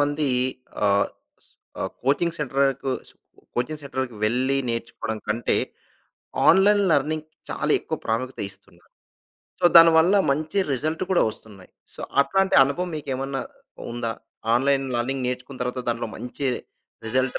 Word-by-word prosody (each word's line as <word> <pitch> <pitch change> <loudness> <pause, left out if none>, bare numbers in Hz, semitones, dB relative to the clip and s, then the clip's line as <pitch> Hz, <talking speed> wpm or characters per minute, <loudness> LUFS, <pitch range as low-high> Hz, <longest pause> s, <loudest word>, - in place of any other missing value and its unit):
మంది 145 +1 +1 0.6
ఆహ్, 100 0 +3 0.7
ఆహ్, - - -2
కోచింగ్ 165 +5 +1
సెంటర్‌కు 135 -1 0 0.2
స్కు - - -22 0.4
కోచింగ్ 150 +5 -2
సెంటర్‌కి 130 -3 -4
వెళ్ళి 130 +5 +1
నేర్చుకోవడం 115 -1 -3
కంటే 115 +3 +1 0.9
ఆన్‌లైన్ 200 +3 +6
లెర్నింగ్‌కి 155 +2 0 0.2
చాలేక్కువ - - 0
ప్రాముఖ్యత 130 +4 -2
ఇస్తున్నారు. 95 - -17 0.7
సో, - - -2
దానివల్ల 165 +2 +7 0.2
మంచి 155 +7 -2
రిజల్ట్ 155 +7 -1
కూడా 185 - +4
ఒస్తున్నాయి. 100 -4 -14 0.2
సో, - - -10 0.2
అట్లాంటి 195 +4 +2
అనుభవం 175 +6 -2
మీకేమన్నా 135 -2 -3 0.5
ఉందా? 120 -1 -2 0.4
ఆన్‌లైన్ 135 +2 +2
లెర్నింగ్ 125 +2 -1
నేర్చుకున్న 125 +1 -6
తర్వాత 125 +1 -3
దాంట్లో 115 -1 -3
మంచి 125 +4 -4 0.6
రిజల్ట్ 130 +3 0
135 Hz, 115 wpm, -24 LUFS, 120-155 Hz, 0.9 s, దానివల్ల